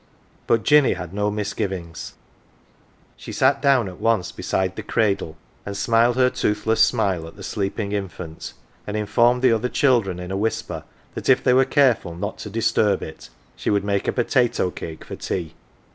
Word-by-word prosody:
1 -, -, -35 dB, 0.4 s
But 115 Hz, -, +2 dB
Jinny 150 Hz, -2 st, +5 dB
had 90 Hz, -1 st, -7 dB
no 105 Hz, +1 st, 0 dB
misgivings: 95 Hz, -5 st, -4 dB, 1.0 s
she -, -, -9 dB
sat -, -, +2 dB
down 135 Hz, -6 st, +3 dB
at 90 Hz, -1 st, -9 dB
once 115 Hz, -5 st, +1 dB
beside 95 Hz, -1 st, -2 dB
the -, -, -5 dB
cradle, 100 Hz, -8 st, -1 dB, 0.3 s
and 100 Hz, -1 st, -5 dB
smiled 115 Hz, +3 st, +3 dB
her 125 Hz, 0 st, +3 dB
toothless 110 Hz, +2 st, 0 dB
smile 100 Hz, -7 st, +2 dB
at 80 Hz, -, -12 dB
the 100 Hz, -, -11 dB
sleeping 100 Hz, +1 st, -3 dB
infant, 90 Hz, -5 st, -5 dB, 0.3 s
and 105 Hz, +1 st, -2 dB
informed 120 Hz, +4 st, +2 dB
the 130 Hz, -, +6 dB
other 115 Hz, +2 st, +1 dB
children 115 Hz, -12 st, +2 dB
in 90 Hz, +1 st, -6 dB
a -, -, -2 dB
whisper 110 Hz, +3 st, -3 dB, 0.3 s
that -, -, -4 dB
if 130 Hz, -, +5 dB
they 125 Hz, -, +4 dB
were 130 Hz, +1 st, +5 dB
careful 130 Hz, -, +2 dB
not 100 Hz, +5 st, -5 dB
to 105 Hz, -, -6 dB
disturb 105 Hz, -2 st, +1 dB
it 80 Hz, -, -10 dB, 0.3 s
she -, -, -3 dB
would 100 Hz, -1 st, +2 dB
make 100 Hz, -1 st, -1 dB
a -, -, +3 dB
po 120 Hz, -, 0 dB
tato 120 Hz, -7 st, +1 dB
cake 80 Hz, -2 st, -8 dB
for -, -, -7 dB
tea. 85 Hz, -4 st, -4 dB
105 Hz, 185 wpm, -22 LUFS, 95-115 Hz, 1.0 s, the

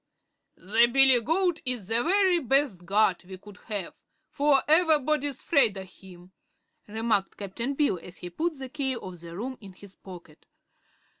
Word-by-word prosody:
"The 220 Hz, +6 st, +3 dB
billygoat 270 Hz, -, +3 dB
is 245 Hz, -7 st, -2 dB
the 225 Hz, +2 st, +1 dB
very 370 Hz, +2 st, +3 dB
best 265 Hz, -, 0 dB
guard 200 Hz, -2 st, +2 dB
we 185 Hz, +1 st, -10 dB
could 200 Hz, 0 st, -15 dB
have, 205 Hz, -5 st, -4 dB, 0.4 s
for 285 Hz, -2 st, +2 dB
ever'body's 305 Hz, -4 st, +2 dB
'fraid 240 Hz, -, +2 dB
o' 190 Hz, -, -6 dB
him," 185 Hz, -1 st, -16 dB, 0.6 s
remarked 220 Hz, -2 st, -1 dB
Cap'n 230 Hz, +7 st, -4 dB
Bill, 280 Hz, -, +1 dB
as 180 Hz, +1 st, -11 dB
he 175 Hz, -, -9 dB
put 320 Hz, -, -3 dB
the 265 Hz, -1 st, -8 dB
key 270 Hz, -2 st, -2 dB
of 185 Hz, -6 st, -9 dB
the 170 Hz, +1 st, -10 dB
room 255 Hz, +5 st, -6 dB
in 195 Hz, -2 st, -12 dB
his 195 Hz, +1 st, -14 dB
pocket. 175 Hz, -5 st, -14 dB
235 Hz, 155 wpm, -26 LUFS, 190-280 Hz, 0.6 s, The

